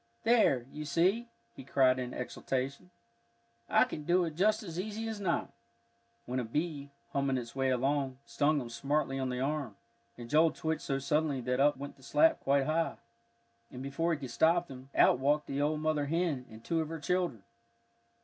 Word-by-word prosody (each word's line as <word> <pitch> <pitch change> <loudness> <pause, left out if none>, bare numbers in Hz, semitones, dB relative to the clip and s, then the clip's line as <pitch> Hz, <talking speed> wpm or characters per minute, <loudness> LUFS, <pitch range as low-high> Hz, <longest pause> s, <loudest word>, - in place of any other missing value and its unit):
"There, 220 - +4
you 150 - -6
see," 180 +11 +1 0.3
he - - -9
cried 130 -1 +3
in 125 -1 -4
exultation, 135 +6 -4 0.8
"I - - +5
can 150 - -5
do 175 +3 +3
it 160 - -4
just 215 +7 +2
as 170 -3 -6
easy 215 +3 -4
as 220 -2 -4
not;" 175 -4 -1 0.7
when 125 +1 -2
a - - -1
bee, 145 +3 -3 0.2
humming 140 -1 +1
its 120 -1 -6
way 135 -1 +1
along, 135 +1 0
stung 145 +6 +1
him 120 -3 -6
smartly 135 +2 -1
on 130 -1 -1
the 125 0 -2
arm, 140 -6 -2 0.4
and 120 -1 -8
Joel 155 +5 +4
twitched 160 0 -2
so 135 - -1
suddenly 150 0 0
that 125 +1 -1
up 145 0 +4
went 140 +1 -8
the - - -20
slat 320 - +3
quite 140 0 +2
high, 165 +2 0 0.8
and 125 +1 -7
before 150 +5 -1
he 160 - +1
could 130 -4 -6
stop 170 +6 +3
them, 130 0 -11
out - - +5
walked 145 +3 +2
the 140 +1 -2
old 150 +1 0
mother 155 -2 0
hen, 160 -5 -1
and 110 0 -13
two 165 -1 0
of 155 - -4
her 165 0 -5
children. 175 - -1
145 Hz, 190 wpm, -31 LUFS, 130-165 Hz, 0.8 s, I